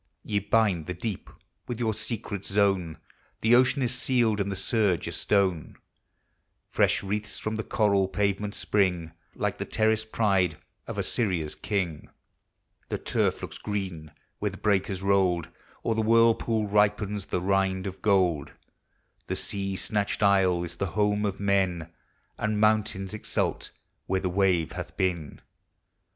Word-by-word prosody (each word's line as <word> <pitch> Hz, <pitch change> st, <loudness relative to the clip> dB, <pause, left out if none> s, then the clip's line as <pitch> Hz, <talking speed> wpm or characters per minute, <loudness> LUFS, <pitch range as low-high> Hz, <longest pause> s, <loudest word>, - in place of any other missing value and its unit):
Ye 100 Hz, -1 st, -1 dB
hind 100 Hz, -8 st, +3 dB
the 90 Hz, -, -3 dB
deep 100 Hz, +1 st, -5 dB, 0.4 s
with 120 Hz, -1 st, -4 dB
your 110 Hz, -2 st, +1 dB
secret 110 Hz, -2 st, -5 dB
zone, 95 Hz, -5 st, +1 dB, 0.2 s
— -, -, -37 dB
The 110 Hz, +2 st, +4 dB
ocean 130 Hz, +2 st, +4 dB
is 125 Hz, 0 st, 0 dB
scaled, 120 Hz, -6 st, +2 dB
and 100 Hz, 0 st, -1 dB
the -, -, -2 dB
surge 100 Hz, -2 st, +1 dB
a -, -, -3 dB
stone; 95 Hz, -6 st, 0 dB, 1.0 s
Fresh -, -, +2 dB
wreaths 105 Hz, +2 st, -3 dB
from 110 Hz, +1 st, -3 dB
the 110 Hz, -, -2 dB
coral 100 Hz, -4 st, +2 dB
pavement 100 Hz, +1 st, -1 dB
spring, 90 Hz, -5 st, +1 dB, 0.2 s
Like -, -, -2 dB
the -, -, -2 dB
terraced 110 Hz, 0 st, 0 dB
pride 95 Hz, -7 st, +2 dB, 0.3 s
of -, -, -5 dB
Assyria's 90 Hz, -9 st, -1 dB
king; 95 Hz, -7 st, -3 dB, 0.8 s
The -, -, -1 dB
turf -, -, 0 dB
looks -, -, -7 dB
green 95 Hz, -7 st, -4 dB, 0.3 s
where -, -, 0 dB
the -, -, -10 dB
breakers 95 Hz, -2 st, 0 dB
rolled; 95 Hz, -4 st, +2 dB, 0.4 s
O'er 115 Hz, -, +2 dB
the 110 Hz, -, 0 dB
whirlpool 115 Hz, 0 st, +3 dB
ripens 105 Hz, -1 st, +1 dB
the -, -, -1 dB
rind 95 Hz, 0 st, +1 dB
of 95 Hz, -1 st, -6 dB
gold; 90 Hz, -8 st, +2 dB, 0.7 s
The -, -, -1 dB
sea 100 Hz, -1 st, -2 dB
snatched 105 Hz, +2 st, -1 dB
isle 95 Hz, -3 st, +4 dB
is 85 Hz, 0 st, -6 dB
the 100 Hz, -, -1 dB
home 105 Hz, 0 st, +2 dB
of 100 Hz, -1 st, -4 dB
men, 95 Hz, -5 st, 0 dB, 0.5 s
And 110 Hz, -1 st, 0 dB
mountains 105 Hz, -2 st, +1 dB
exult 110 Hz, -, -2 dB, 0.4 s
where 95 Hz, -, +1 dB
the 95 Hz, -, -1 dB
wave 90 Hz, -3 st, +2 dB
hath -, -, -7 dB
been. 85 Hz, -5 st, -2 dB
100 Hz, 150 wpm, -27 LUFS, 95-110 Hz, 1.0 s, The